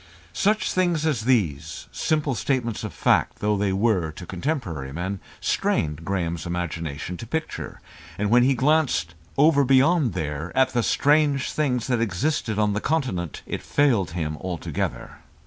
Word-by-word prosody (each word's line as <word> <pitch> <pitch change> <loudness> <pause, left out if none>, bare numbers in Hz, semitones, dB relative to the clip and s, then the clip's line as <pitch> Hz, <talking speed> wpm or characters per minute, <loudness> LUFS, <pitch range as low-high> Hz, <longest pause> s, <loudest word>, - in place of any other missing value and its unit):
Such 210 0 +1
things 175 -4 +1
as 130 -9 0
these, 80 - 0
simple 150 -3 0
statements 120 -2 -1
of - - -4
fact - - +2
though 105 0 +1
they 100 -1 0
were 95 -5 +1
to 90 - -9
contemporary 90 - -3
men, 95 +6 -3 0.2
strained 75 0 0
Graham's 85 -3 -2
imagination 85 -1 -4
to 115 - -8
picture. 160 +6 -4 0.4
And 105 +1 -1
when 120 +1 +6
he 130 +2 +3
glanced 135 - +2 0.2
"over 145 0 +5
beyond 135 - +4
there" 75 +2 -3
at 130 0 +5
the 125 -2 0
strange 145 +2 +2
things 125 -6 0
that 125 -3 0
existed 115 - -1
on 105 -1 +2
the 105 - -2
Continent, 125 - -2
it - - -4
failed 115 - +2
him 75 -2 -2
altogether. 90 -1 -4
110 Hz, 150 wpm, -24 LUFS, 85-140 Hz, 0.4 s, when